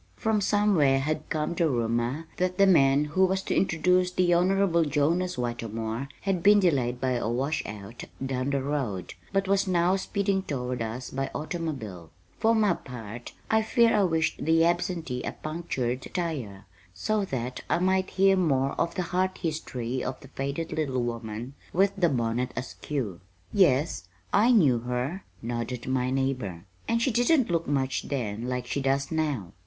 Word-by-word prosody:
From 220 -2 +1
somewhere 195 -10 +3
had 150 +3 -2
come 155 +1 -1
the 170 -1 +1
rumor 120 +4 -1
that 180 0 0
the 200 - +6
man 145 -5 +5
who 160 +6 +1
was 190 +1 +2
to - - -1
introduce 180 0 +2
the 180 -1 +2
Honorable 180 -1 +3
Jonas 160 +5 +1
Whitermore 115 0 -3
had 195 -3 0
been 205 +3 +6
delayed 130 -10 +1
by 130 0 0
a 120 -2 -1
washout 120 -5 -3 0.2
"down 130 0 -1
the 140 -1 0
road," 130 -11 -2 0.2
but 195 0 +1
was 195 0 +2
now 180 0 +3
speeding 195 0 0
toward 125 -7 -3
us 115 +3 -4
by 135 +1 -2
automobile. 140 - -4 0.3
For 225 +1 +3
my 210 -4 +3
part, 120 -5 -8 0.2
I 220 0 +4
fear 230 0 +3
I 210 - +4
wished 165 -2 0
the 165 +1 +4
absentee 170 -6 -1
a - - -4
punctured 135 -6 -3
tire 130 - -3 0.3
so 215 - 0
that 125 -5 -4
I - - +3
might 185 +1 +1
hear 195 0 +4
more 140 -7 +2
of 170 - 0
the 185 - 0
heart 185 +2 -1
history 130 -7 -3
of 130 - -4
the 135 - -13
faded 140 +4 -3
little 135 -5 -1
woman 115 +1 -5 0.2
with 195 +3 +3
the 180 -4 +3
bonnet 125 -1 -1
askew. 125 - -4 0.3
"Yes, 160 -6 +3 0.3
I 220 +5 +5
knew 145 - +5
her," 125 +10 -3 0.2
nodded 120 +1 -3
my 130 -1 +1
neighbor, 130 -10 -2 0.2
"and 230 0 +1
she 260 - +2
didn't 245 - +3
look 165 -1 0
much 135 -2 0
then 120 -3 -3
like 125 -1 -2
she 140 +3 -2
does 135 +2 0
now. 145 - -1
145 Hz, 165 wpm, -27 LUFS, 125-185 Hz, 0.3 s, the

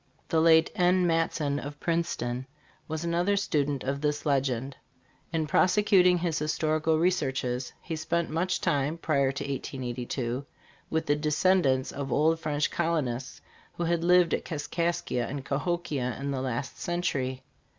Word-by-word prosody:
The 160 - +3
late 160 0 +5
N. 180 0 +3
Matson.f 165 -4 0
of 145 +1 -7
Princeton, 130 -7 -2 0.4
was 160 +1 -3
another 175 +4 +1
student 145 -7 0
of 140 +2 -2
this 150 0 -1
legend. 135 -2 0 0.6
In 160 -1 0
prosecuting 180 +2 +4
his 170 -2 -1
historical 155 +1 +1
researches, 135 -7 0
he 165 - -4
spent 170 +1 -1
much 175 +4 0
time 145 +3 0
(prior 140 -5 +1
to 135 - -4
1882) 125 -1 -3 0.5
with 160 0 0
the 145 - +2
descendants 150 -3 +2
of 140 -2 -5
old 160 +4 +3
French 150 -2 -1
colonists 135 -6 -2 0.3
who 175 - -3
had 170 0 0
lived 180 -1 +5
at - - 0
Kaskaskia 170 -3 -2
and 135 +1 -5
Cahokia 140 -5 -2
in 140 +1 -2
the 135 -2 -2
last 130 +1 -3
century. 135 -7 -2
150 Hz, 140 wpm, -28 LUFS, 135-170 Hz, 0.6 s, late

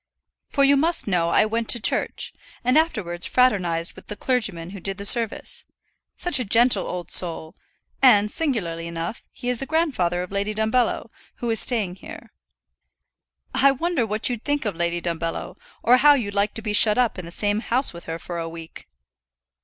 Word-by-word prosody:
For 280 - +1
you 280 +1 +4
must 330 +4 +1
know 175 -4 0
I 215 - +3
went 225 +1 -3
to 240 - +7
church, - - 0 0.3
and 250 +1 +1
afterwards 210 - 0
fraternized 180 -10 +1
with - - -16
the 210 - -5
clergyman 200 -10 -2
who 200 - -9
did 195 +2 -5
the 200 - -5
service; 225 +1 +3 0.5
such 355 -7 +2
a - - 0
gentle 230 -1 +3
old 180 -1 -6
soul, 165 -3 +2 0.5
and, 210 -6 +5
singularly 175 - -2
enough, 170 +5 -6
he 245 - -9
is 250 -1 0
the 270 - -5
grandfather 250 - 0
of 180 - -10
Lady 200 +2 -2
Dumbello, 220 +3 0 0.3
who 240 -1 -3
is 225 - +2
staying 205 -7 +1
here. - - -12 1.2
I 275 - +4
wonder 335 -1 -1
what 215 +1 +1
you'd 240 -3 -4
think 290 -3 -2
of 205 -4 -2
Lady 170 0 -2
Dumbello, 170 +1 -4 0.3
or 245 +2 +5
how 290 +2 +6
you'd 210 -7 -3
like 200 +1 -1
to 225 - -5
be 210 -2 -3
shut 210 +1 +4
up 245 -6 0
in 180 - -7
the - - -9
same 205 +3 +1
house 245 +2 -1
with 170 - -11
her 165 0 -5
for 170 +1 -7
a 165 0 -5
week? 165 0 -11
210 Hz, 190 wpm, -22 LUFS, 175-250 Hz, 1.2 s, to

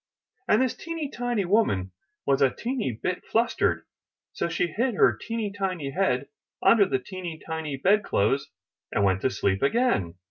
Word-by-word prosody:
*' - - -48
And - - +4
this 255 - 0
teeny 330 -4 -5
tiny 240 -6 -1
woman 175 - +2 0.3
was 140 0 +2
a 135 - +6
teeny 245 - -3
tiny 115 -3 -3 0.2
bit - - -32
flustered; 230 +1 +1 0.5
so - - -2
she 170 +1 +1
hid 225 +8 -1
her - - +4
teeny 225 -3 -4
tiny 185 -8 -2
head 135 -6 0 0.4
under 210 -4 +6
the 135 - +1
teeny 170 +5 -7
tiny 160 -4 -4
bed 200 +8 +3
clothes 135 - +1 0.4
and 105 - +1
went 95 -1 +2
to - - +2
sleep 95 -5 0
again. 140 - +1
180 Hz, 175 wpm, -26 LUFS, -, 0.5 s, a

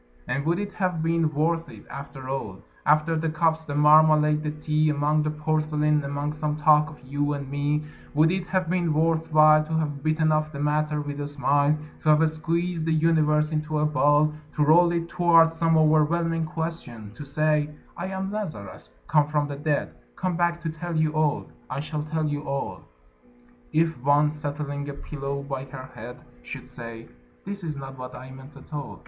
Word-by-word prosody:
And 135 +4 -2
would 170 +1 +2
it 205 +1 -4
have 180 -5 -1
been 165 -1 +1
worth 165 +3 0
it, - - -13
after 140 -1 -8
all, 120 -8 -5 0.2
After 155 +2 +3
the 160 0 0
cups, 160 0 +1
the 145 - -4
marmalade, 150 0 +5
the 150 - -2
tea, 155 0 0
Among 150 +1 +1
the 150 - 0
porcelain, 150 -1 0
among 145 +1 -3
some 150 0 -2
talk 150 0 +4
of 150 - -13
you 145 +2 -1
and 140 -1 -5
me, 145 +1 0 0.3
Would 155 +2 +4
it 185 -1 -2
have 185 -1 0
been 170 -3 0
worth 160 +1 +1
while, 155 0 +6
To 160 +1 -6
have 145 -3 -2
bitten 155 +1 +1
off 155 0 +1
the 140 - -7
matter 150 +1 0
with 145 0 -5
a 145 - -3
smile, 145 +1 +2 0.2
To 155 - 0
have 155 +1 +5
squeezed 165 +2 -2
the - - +2
universe 155 -1 +2
into 155 0 -2
a 150 - +2
ball 150 0 +3 0.2
To 150 - +2
roll 170 +3 +5
it 170 -1 -1
toward 170 -2 +4
some 165 0 +2
overwhelming 160 +1 +2
question, 155 -10 -5
To 135 - -9
say: 150 +1 +1 0.3
"I 175 - -4
am 190 0 -4
Lazarus, 155 - -6 0.2
come 150 -1 +3
from 150 -1 0
the 145 - -5
dead, 145 0 -1 0.2
Come 185 -2 -2
back 170 0 0
to 165 - -2
tell 170 +1 -5
you 155 -1 +2
all, 155 -2 +1 0.2
I - - -3
shall 150 +1 -3
tell 155 +1 -2
you 145 -1 -2
all" 140 0 -3 0.9
If 160 -3 +1
one, 145 +2 +3
settling 145 -1 -4
a - - -4
pillow 140 -1 -5
by 135 -1 -5
her 130 -1 -10
head, 120 +3 -9 0.2
Should - - -8
say, 115 -1 -9 0.4
"That 200 -1 -6
is 155 -3 -4
not 135 -1 -8
what 125 0 -7
I 130 +1 -10
meant 135 +2 -12
at - - -14
all. 145 -2 -5
150 Hz, 195 wpm, -25 LUFS, 145-160 Hz, 0.9 s, while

